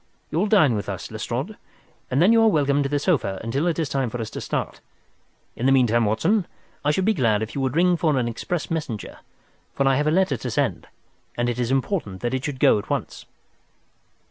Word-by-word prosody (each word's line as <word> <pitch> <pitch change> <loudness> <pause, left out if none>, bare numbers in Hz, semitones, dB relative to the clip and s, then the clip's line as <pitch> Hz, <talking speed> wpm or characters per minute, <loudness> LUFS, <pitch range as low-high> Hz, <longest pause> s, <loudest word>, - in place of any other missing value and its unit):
You'll 175 +7 +1
dine 185 - +4
with 105 -2 -3
us, - - -6
Lestrade, - - -4 0.5
and 130 - 0
then 200 - +5
you 225 - +5
are 225 - +5
welcome 145 -7 +2
to 140 - -1
the 145 - +1
sofa 140 - 0
until 135 +9 -1
it 170 - 0
is 160 -3 0
time 135 -3 -1
for 120 - -5
us 110 -2 -5
to - - -6
start. - - -3 0.7
In 125 - -1
the - - +4
meantime, 120 -3 +3
Watson, 165 - +1 0.4
I 145 - +1
should 185 +5 +1
be 220 - +3
glad 115 - +1
if 110 - -6
you 140 - -3
would 130 +1 -1
ring 180 +1 +4
for 155 -4 +1
an 120 -2 0
express 155 +10 -4
messenger, 150 -10 -4 0.6
for 140 - +1
I 135 -1 +3
have 150 +1 0
a - - +4
letter 165 -4 +2
to - - -5
send - - -1 0.5
and 120 0 0
it 120 0 -3
is 120 -1 0
important 130 - -1
that 120 +1 -2
it 130 0 -2
should 135 -2 -4
go 105 - +5
at - - -10
once." - - -4
135 Hz, 225 wpm, -23 LUFS, 120-165 Hz, 0.7 s, then